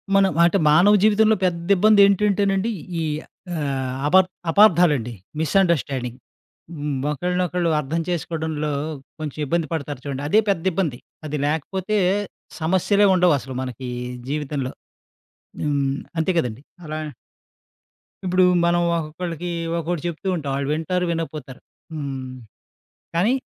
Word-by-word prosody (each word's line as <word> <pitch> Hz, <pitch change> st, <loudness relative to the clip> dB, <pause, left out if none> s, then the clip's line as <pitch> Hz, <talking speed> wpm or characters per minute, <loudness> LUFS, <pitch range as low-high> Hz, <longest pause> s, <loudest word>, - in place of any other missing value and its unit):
మనం 195 Hz, -1 st, +4 dB
అంటే, 175 Hz, +3 st, +4 dB
మానవ 175 Hz, +7 st, +6 dB
జీవితంలో 215 Hz, +1 st, +5 dB
పెద్దబ్బందేంటంటేనండీ, 200 Hz, +3 st, +3 dB, 0.3 s
ఈ -, -, 0 dB, 0.5 s
ఆహ్, 135 Hz, -4 st, -2 dB
అబ 150 Hz, -, +2 dB, 0.4 s
అపార్ధాలండి, 165 Hz, -, +4 dB, 0.3 s
మిసండర్‌స్టాండింగ్. 140 Hz, -8 st, +1 dB, 0.6 s
హ్మ్. 145 Hz, -2 st, -2 dB
ఒకళ్ళనొకళ్ళు 180 Hz, +2 st, 0 dB
అర్థం 155 Hz, +3 st, -2 dB
చేసుకోడంలో 160 Hz, -3 st, -2 dB, 0.5 s
కొంచెం 155 Hz, -1 st, -5 dB
ఇబ్బంది 165 Hz, +2 st, 0 dB
పడతారు 145 Hz, -4 st, -4 dB
చూడండి, 140 Hz, -1 st, -4 dB
అదే 215 Hz, +6 st, +5 dB
పెద్దిబ్బంది. 165 Hz, -7 st, 0 dB, 0.3 s
అది 150 Hz, 0 st, -3 dB
లేకపోతే 185 Hz, +7 st, -1 dB, 0.6 s
సమస్యలే 190 Hz, +5 st, +3 dB
ఉండవసలు 145 Hz, -8 st, +2 dB
మనకీ 125 Hz, 0 st, -6 dB, 0.4 s
జీవితంలో. 145 Hz, -3 st, -3 dB, 0.9 s
హ్మ్. 140 Hz, -2 st, 0 dB, 0.2 s
అంతే 160 Hz, +4 st, +1 dB
కదండి. 125 Hz, -2 st, -3 dB, 0.2 s
అలా 155 Hz, 0 st, -4 dB, 1.3 s
ఇప్పుడూ 185 Hz, 0 st, +3 dB, 0.2 s
మనం 175 Hz, 0 st, +3 dB
ఒక్కొక్కళ్ళకీ 165 Hz, +2 st, -4 dB, 0.3 s
ఒక్కోటి 170 Hz, -1 st, -2 dB
చెప్తూ 170 Hz, +3 st, -5 dB
ఉంటాం. 145 Hz, -5 st, -3 dB
ఆళ్ళు 140 Hz, 0 st, -2 dB
వింటారు, 180 Hz, +3 st, -1 dB
వినకపోతారు. 155 Hz, -5 st, -5 dB, 0.3 s
హ్మ్. 135 Hz, -4 st, -5 dB, 0.8 s
కానీ 195 Hz, +9 st, +3 dB
160 Hz, 105 wpm, -22 LUFS, 145-185 Hz, 1.3 s, మానవ